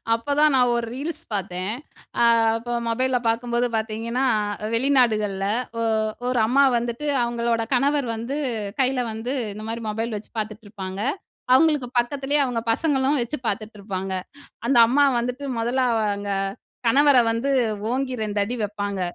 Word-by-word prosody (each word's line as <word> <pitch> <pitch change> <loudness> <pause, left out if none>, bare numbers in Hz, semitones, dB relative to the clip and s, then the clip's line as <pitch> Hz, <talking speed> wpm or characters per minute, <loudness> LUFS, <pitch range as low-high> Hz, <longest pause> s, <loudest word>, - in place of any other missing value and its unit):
அப்பதான் 285 +5 +2
நான் 250 -2 +4
ஒரு 235 0 -1
ரீல்ஸ் 295 +6 -5
பாத்தேன். 190 0 -2 0.5
அ - - +6 0.3
அப்ப 240 +1 -4
மொபைல்ல 255 +2 +1
பாக்கும்போது 235 +1 +1
பாத்தீங்கன்னா, 225 +3 -2 0.4
அ - - -1
வெளிநாடுகள்ல 230 -6 +2 0.4
ஒ - - 0 0.5
ஒரு 250 -1 +1
அம்மா 275 +4 +4
வந்துட்டு 235 +4 -3 0.2
அவுங்களோட 235 -1 0
கணவர் 280 +1 +2
வந்து 235 +6 -4 0.4
கையில 260 0 +1
வந்து 225 +4 -4 0.2
இந்தமாரி 225 +2 -5
மொபைல் 225 +1 -2
வச்சு 210 - -12
பாத்துட்டுருப்பாங்க. 205 -3 -6 0.5
அவுங்களுக்கு 295 -1 +4
பக்கத்திலயே 270 +4 +1
அவுங்க 245 -3 -1
பசங்களும் 280 +1 +1
வச்சு 240 +6 -3
பாத்துட்டுருப்பாங்க. 200 -3 -3 0.5
அந்த 260 +1 +2
அம்மா 280 +5 +4
வந்துட்டு 250 +4 -3
முதல்ல 240 +3 0
அவங்க 205 -2 -1 0.6
கணவர 280 +3 +5
வந்து 230 +4 -1 0.4
ஓங்கி 260 +1 -1
2 210 -1 -3
அடி 215 +5 -2
வைப்பாங்க! 205 -1 -3
235 Hz, 130 wpm, -23 LUFS, 215-260 Hz, 0.6 s, அ